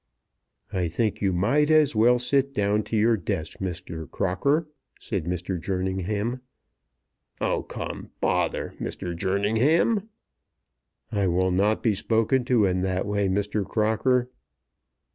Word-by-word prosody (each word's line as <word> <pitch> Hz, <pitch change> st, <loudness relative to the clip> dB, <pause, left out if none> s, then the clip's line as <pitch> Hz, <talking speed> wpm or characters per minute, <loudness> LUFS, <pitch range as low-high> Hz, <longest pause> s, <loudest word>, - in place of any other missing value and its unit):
"I 90 Hz, -2 st, 0 dB
think 105 Hz, +6 st, -1 dB
you 100 Hz, -2 st, +2 dB
might 120 Hz, -, +2 dB
as 155 Hz, -5 st, +4 dB
well 120 Hz, +3 st, +5 dB
sit 135 Hz, +2 st, +1 dB
down 105 Hz, +1 st, +2 dB
to 110 Hz, -, -2 dB
your 115 Hz, +2 st, +4 dB
desk, 90 Hz, -5 st, -4 dB
Mr. 85 Hz, -4 st, -5 dB
Crocker," 140 Hz, -, 0 dB, 0.3 s
said 95 Hz, -7 st, -3 dB
Mr. 90 Hz, 0 st, -3 dB
Jerningham. 95 Hz, +6 st, -2 dB, 1.0 s
"Oh, -, -, 0 dB
come, -, -, -7 dB
bother, 90 Hz, -2 st, 0 dB
Mr. 85 Hz, -1 st, -4 dB
Jerningham!" 115 Hz, -, +2 dB, 1.0 s
"I 100 Hz, -2 st, +1 dB
will 90 Hz, +1 st, +2 dB
not 100 Hz, +4 st, +1 dB
be 115 Hz, -4 st, +3 dB
spoken 115 Hz, +5 st, +1 dB
to 120 Hz, -5 st, +3 dB
in 90 Hz, -1 st, +1 dB
that 95 Hz, 0 st, -1 dB
way, 100 Hz, -1 st, 0 dB
Mr. 100 Hz, +2 st, 0 dB
Crocker." 110 Hz, +5 st, +1 dB
105 Hz, 125 wpm, -25 LUFS, 95-120 Hz, 1.0 s, well